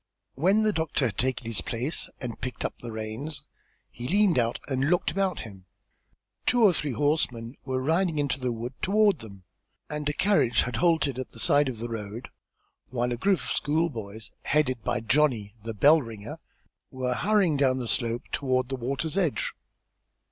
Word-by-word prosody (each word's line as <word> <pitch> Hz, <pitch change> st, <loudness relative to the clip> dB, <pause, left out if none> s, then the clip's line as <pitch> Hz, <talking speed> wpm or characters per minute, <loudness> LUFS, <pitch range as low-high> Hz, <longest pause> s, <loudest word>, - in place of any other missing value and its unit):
When 190 Hz, +9 st, +3 dB
the 215 Hz, -1 st, +2 dB
doctor 160 Hz, -5 st, 0 dB
had 110 Hz, -6 st, -2 dB
taken 125 Hz, -1 st, 0 dB
his 115 Hz, -2 st, -1 dB
place 125 Hz, +7 st, -2 dB
and 120 Hz, -2 st, -6 dB
picked 125 Hz, +1 st, -4 dB
up -, -, -2 dB
the 120 Hz, -, -7 dB
reins 110 Hz, +7 st, -5 dB, 0.5 s
he 120 Hz, +1 st, -6 dB
leaned 195 Hz, -4 st, +4 dB
out 115 Hz, 0 st, 0 dB
and 135 Hz, +1 st, 0 dB
looked 180 Hz, 0 st, +2 dB
about 190 Hz, -3 st, 0 dB
him. 95 Hz, -4 st, -11 dB, 0.8 s
Two 245 Hz, -1 st, +4 dB
or 200 Hz, -4 st, +7 dB
three 150 Hz, -4 st, -2 dB
horsemen 125 Hz, -3 st, 0 dB
were 130 Hz, -1 st, -1 dB
riding 165 Hz, +4 st, +1 dB
into 145 Hz, -1 st, 0 dB
the 125 Hz, -1 st, -1 dB
wood 120 Hz, +2 st, -5 dB
toward 205 Hz, -3 st, +3 dB
them, 100 Hz, -4 st, -11 dB, 0.5 s
and 150 Hz, -1 st, -2 dB
a -, -, 0 dB
carriage 145 Hz, -, +3 dB
had 120 Hz, -2 st, -3 dB
halted 160 Hz, -7 st, +2 dB
at 130 Hz, -, -6 dB
the 115 Hz, -, -9 dB
side 145 Hz, +4 st, +4 dB
of 125 Hz, -, -5 dB
the 115 Hz, +2 st, -4 dB
road, 115 Hz, +1 st, -6 dB, 0.6 s
while 125 Hz, 0 st, -1 dB
a -, -, 0 dB
group 185 Hz, +5 st, +2 dB
of -, -, -4 dB
schoolboys, 115 Hz, -, -1 dB
headed 130 Hz, -6 st, +1 dB
by 120 Hz, -1 st, 0 dB
Johnny, 115 Hz, -4 st, +2 dB
the 115 Hz, +1 st, -5 dB
bell 150 Hz, +9 st, +6 dB
ringer, 115 Hz, +5 st, -8 dB, 0.5 s
were 130 Hz, -2 st, -2 dB
hurrying 195 Hz, +1 st, +2 dB
down 135 Hz, -2 st, +3 dB
the 125 Hz, -2 st, -3 dB
slope 115 Hz, 0 st, +1 dB
toward 130 Hz, -2 st, 0 dB
the 135 Hz, -, -1 dB
water's 140 Hz, +8 st, -2 dB
edge. 170 Hz, -7 st, 0 dB
130 Hz, 180 wpm, -27 LUFS, 115-155 Hz, 0.8 s, or